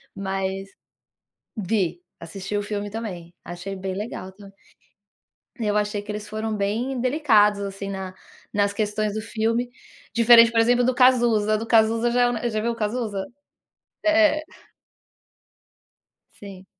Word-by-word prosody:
mas 195 0 -3 0.9
vi, 185 -4 -1 0.2
assisti 195 +4 -5
o 205 - 0
filme 205 0 -4
também. 185 -6 -7
Achei 180 +3 -7
bem 190 0 -4
legal 190 -2 -6
tam 200 +1 -14 1.1
Eu 210 -2 0
achei 210 0 -1
que 205 +1 -7
eles 210 0 -6
foram 215 +1 -3
bem 225 +6 -2
delicados, 235 -7 +3
assim, 195 0 -5
na 190 -1 -5 0.4
nas 205 0 +1
questões 215 -1 -1
do 215 - -3
filme. 230 +2 -1 0.4
Diferente, 230 0 +7
por 230 - +2
exemplo, 245 +2 +4
do 255 - +2
Cazuza. 235 -4 +3
Do 225 - -5
Cazuza 225 +1 +3
já 245 +1 +2
é 245 - +3
u 240 0 -2
já 215 -1 -2
viu 235 +2 0
o - - -5
Cazuza? 215 -3 -2 0.8
É 315 -1 +4
é. - - -7 2.0
Sim. 195 -2 -11
210 Hz, 145 wpm, -23 LUFS, 195-230 Hz, 2.0 s, Diferente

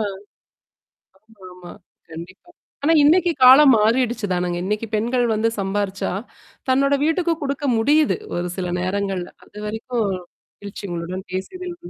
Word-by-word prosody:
ஆ. - - 0 1.3
ஆமா 220 -4 -21
ஆமா. 180 -1 -11 0.4
கண்டிப்பா. 180 - -11 0.4
ஆனா, 325 - +5
இன்னைக்கு 345 +3 +4
காலம் 265 +3 +8
மாறிடுச்சு 230 +1 +1
தானுங்க. 180 -1 -1
இன்னைக்கு 210 +3 -2
பெண்கள் 240 +4 0
வந்து 220 +2 +1
சம்பாரிச்சா, 195 0 -2 0.6
தன்னோட 275 +2 +3
வீட்டுக்கு 335 +1 +1
குடுக்க 280 +1 -3
முடியுது. 290 +7 +3 0.2
ஒரு 175 0 -3
சில 180 -2 -3
நேரங்கள்ல. 190 -1 -2 0.2
அதுவரைக்கும் 220 +3 -4 0.5
மகிழ்ச்சி 200 0 -9
உங்களுடன் 175 +3 -5
பேசியதில். 355 - -5
215 Hz, 120 wpm, -21 LUFS, 190-275 Hz, 1.3 s, காலம்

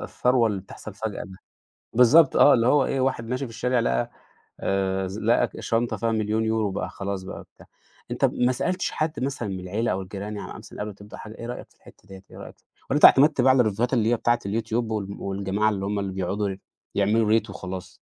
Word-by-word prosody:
الثروة 125 -2 +1
اللي 100 -3 -2
بتحصل 100 +1 -11
فجأة 110 -1 -4
ده. 95 -1 -12 0.5
بالضبط، 130 +6 +6
آه، 145 - +7
اللي 115 -1 +2
هو 140 +1 +4
إيه، 135 - -1
واحد 130 -3 -1
ماشي 130 +3 -2
في - - -11
الشارع، 125 +2 0
لقى 60 - 0 0.5
آآ، 95 -1 -1
ز 100 +3 -6
لقى 115 +2 +2
شنطة 115 +1 -1
فيها 115 -1 0
1,000,000€، 110 -1 0
بقى - - -3
خلاص 100 -1 -5
بقى - - -8
بتاع. - - -17 0.4
أنت - - +2
ما 125 +1 +1
سألتش 180 +8 -1
حد 155 +1 -2
مثلًا 130 -6 -3
من 95 -1 -4
العيلة 105 +6 -1
أو 95 +1 -2
الجيران 100 +2 -6
يعني - - -7
مثلًا - - -12
قبل 105 - -3
ما 100 - -10
تبدأ 100 +1 -12
حاجة. 110 - -9
إيه 115 - -8
رأيك 120 - -7
في - - -29
الحتّة 100 - -19
ديّة، 95 0 -12
إيه - - -12
رأيك - - -10 0.3
والّا 140 - +1
أنت - - +8
اعتمدت 140 0 +6
بقى 130 +1 +6
على 130 -1 +5
الريفيوهات 115 +4 0
اللي 115 -2 +2
هي - - +4
بتاعة 120 +1 +1
الYouTube، 110 +2 -3 0.2
وال 105 -3 -2
والجماعة 100 +2 0
اللي 100 -2 -3
هم 100 0 -1
اللي 95 -1 -3
بيقعدوا 95 +2 -2 0.4
يعملوا 105 +2 +2
ريت 110 -1 +2
وخلاص؟ 95 -1 -7
110 Hz, 220 wpm, -25 LUFS, 100-120 Hz, 0.5 s, أنت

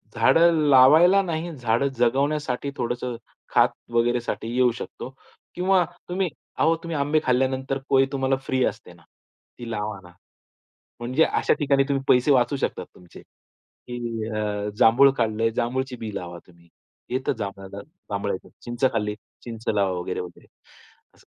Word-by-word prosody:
झाडं 170 +1 +5 0.2
लावायला 155 +9 +7
नाही, 170 -1 -3
झाडं 120 +1 0
जगवण्यासाठी 140 +2 0
थोडंसं, 120 0 -3 0.4
खात - - +5 0.2
वगैरेसाठी 120 -1 0
येऊ 125 -1 +4
शकतो 125 - -8 0.5
किंवा 185 +1 +3 0.3
तुम्ही 185 -1 -1 0.3
अहो 165 - +4
तुम्ही 170 -2 -4
आंबे 145 +2 +2
खाल्ल्यानंतर 130 +1 0
कोय 135 -1 +5
तुम्हाला 135 -1 +1
फ्री 130 -1 0
असते - - -5
ना? - - -21 0.6
ती 120 - -7
लावा 105 -1 -4
ना, 90 - -15 0.9
म्हणजे 130 +7 +2
अशा - - +1
ठिकाणी 140 -2 +2
तुम्ही 135 -1 0
पैसे 125 +3 +4
वाचवू 130 0 +3
शकतात - - -3
तुमचे 90 -1 -15 0.7
की 120 - -4 0.3
अ, 105 -1 -2
जांभूळ 135 +5 +6
खाल्ले, 115 0 +1
जांभूळची 125 +3 -2
बी 110 -3 -7
लावा 85 -1 -6
तुम्ह. 85 -1 -21 0.4
येतं 130 +2 -1
जांभळ्याला, 100 -1 -6 0.3
जांभळ्याचं. 100 -1 -3
चिंच 120 +2 -3
खाल्ली, 105 -2 -1 0.3
चिंच 115 -2 -8
लावा 100 -3 +2
वगैरे-वगैरे 90 0 -6 0.7
असं. - - -24
125 Hz, 140 wpm, -24 LUFS, 110-140 Hz, 0.9 s, लावायला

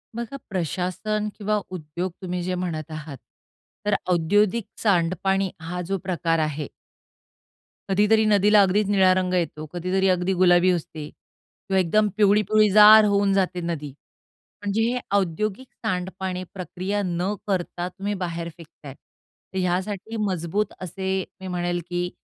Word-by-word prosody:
बघा 235 +4 -5
प्रशासन 190 +4 -2
किंवा 210 0 0
उद्योग 175 +1 -4
तुम्ही 180 -1 -3
जे 185 +1 -2
म्हणत 165 -4 -4
आहात 155 -2 -7 0.7
तर 210 -1 +2 0.2
औद्योगिक 205 +6 +2 0.2
सांडपाणी 190 0 +1
हा 180 +2 -4
जो 195 0 0
प्रकार 170 -3 0
आहे 155 -2 -2 1.2
कधीतरी 210 +3 +3
नदीला 210 0 +5
अगदीच 195 +2 +2
निळा 190 -2 +4
रंग 185 0 0
येतो, 165 -3 -1
कधीतरी 185 +2 0
अगदी 180 +1 +1
गुलाबी 180 0 +5
असते 155 -3 -4
किंवा 190 -1 -6
एकदम 210 +4 +3
पिवळी-पिवळीजार 210 +1 +6
होऊन 200 -1 +2
जाते 185 -2 0
नदी. 165 -4 -4 0.7
म्हणजे 205 +2 0
हे 245 +2 +1 0.2
औद्योगिक 200 +6 -2 0.2
सांडपाणी 185 -1 -3
प्रक्रिया 190 +2 -3
न 180 +3 -1
करता 180 -2 -2
तुम्ही 200 +2 -4
बाहेर 170 -3 -4
फेकत 165 -2 -16
आहे. 135 - -7
तर 190 - -16
यासाठी 190 +5 -2
मजबूत 190 +2 -1
असे 190 +1 -2 0.2
मी 190 - -6
म्हणेल, 175 -1 -2
की 175 0 -1
185 Hz, 130 wpm, -24 LUFS, 175-205 Hz, 1.2 s, पिवळी-पिवळीजार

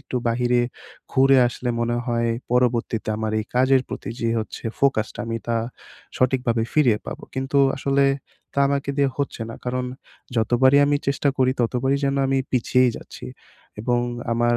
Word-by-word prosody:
একটু 135 - -5
বাহিরে 120 +1 +2 0.5
ঘুরে 135 0 +5
আসলে 120 0 -5
মনে 120 0 0
হয় 115 -1 0 0.2
পরবর্তীতে 120 -3 +1
আমার 110 0 -2
এই - - -5
কাজের 130 +1 +4
প্রতি - - -6
যে 115 - 0
হচ্ছে 110 - -6
ফোকাসটা 135 -6 +1
আমি 115 0 -2
তা 115 -1 0 0.6
সঠিকভাবে 125 -3 +1
ফিরিয়ে 125 -8 +3
পাবো। - - -6
কিন্তু 135 +2 0 0.2
আসলে 140 0 +2 0.5
তা - - -2
আমাকে 140 0 -1
দিয়ে 140 -1 +3
হচ্ছে 140 -4 -2
না। - - -7
কারণ 125 0 -1 0.5
যতবারই 125 +4 +4
আমি 145 0 +3
চেষ্টা 140 +1 +1
করি, 130 -1 +4
ততবারই 125 +3 +1
যেন 140 0 +1
আমি 135 0 +1
পিছিয়েই 125 0 +3
যাচ্ছি - - -10 0.5
এবং 120 +2 +1 0.3
আমার 120 0 +2
125 Hz, 155 wpm, -23 LUFS, 115-135 Hz, 0.6 s, ঘুরে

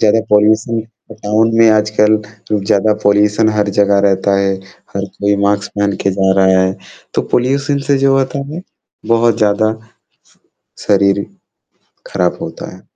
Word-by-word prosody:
ज़्यादा 110 +1 +3
पॉल्यूशन 110 +2 +2
अ, 110 -1 -16
गाँव 105 +2 +1 0.2
में 115 0 +6
आजकल 105 0 +2 0.5
ज़्यादा 105 +2 +2
पॉल्यूशन 105 +2 +2
हर 105 0 +1
जगह 100 0 +3
रहता 95 +1 0
है। 95 0 0 0.4
हर 100 - -2
कोई 100 0 +1
मास्क 100 0 -1
पहन 100 -1 0
के 100 - +1
जा 95 0 +1
रहा 95 0 +4
है। 95 0 -1 0.4
तो - - 0
पॉल्यूशन 140 +3 0
से 140 - +3
जो 135 0 +2
होता 135 +1 -2
है 170 +3 -7 0.5
बहुत 115 -1 +2
ज़्यादा, 110 +1 +1 1.2
शरीर 100 0 +2 0.9
खराब - - 0
होता - - -8
है। - - -17
105 Hz, 150 wpm, -14 LUFS, 100-115 Hz, 1.2 s, में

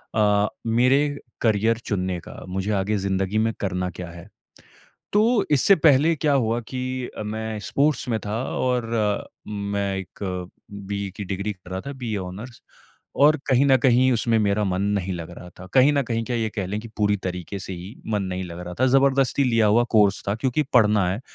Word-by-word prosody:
अ, 105 -1 +3 0.2
मेरे 135 +5 +3 0.2
करियर 110 0 +2
चुनने 95 -4 -2
का, - - -11
मुझे 95 +3 -2
आगे 105 +3 0
ज़िंदगी 95 +1 -1
में 115 0 +1
करना 90 -2 -2
क्या 90 0 -8
है। 85 +3 -11 0.9
तो 210 - +5 0.3
इससे 150 +7 +5
पहले 155 0 +4
क्या 145 0 +1
हुआ 120 -3 +1
कि 130 -1 -4 0.4
अ, - - -4
मैं 110 0 -4
स्पोर्ट्स 145 -2 +1
में 110 - 0
था 110 +4 -3 0.2
और 125 -2 0 0.6
मैं 100 -1 -2
एक 95 +1 -8 0.5
बीए 100 0 -4
की 105 - -4
डिग्री 100 +2 -3
कर 90 -1 -16
रहा 95 +1 -3
था, 140 - -6
बीए 120 -5 -4
ऑनर्स, 100 +7 -8 0.5
और 150 +2 +5
कहीं 135 0 +4
न 135 -2 +5
कहीं 130 0 +4
उसमें 115 -1 +2
मेरा 105 0 +1
मन 95 -1 -1 0.2
नहीं 95 -1 -3
लग 85 0 -6
रहा 90 - -10
था। 95 - -9
कहीं 135 +3 +6
न 140 - +2
कहीं 115 -2 -2
क्या, 125 - -2
ये 110 -1 -1
कह 100 -4 -2
लें 105 +3 -3
कि 115 - -9
पूरी 105 -1 +2
तरीके 90 +2 -5
से 95 - -6
ही 90 +5 -9 0.2
मन 105 - +1
नहीं 95 +1 -3
लग 85 0 -8
रहा 90 0 -6
था, 130 - +4
ज़बरदस्ती 135 +1 +3
लिया 115 -4 +3
हुआ 115 +3 +4
कोर्स 105 -3 +3
था 100 - +1
क्योंकि 130 +6 0
पढ़ना 105 -5 +4
है। 100 +6 -4
105 Hz, 195 wpm, -23 LUFS, 95-125 Hz, 0.9 s, कहीं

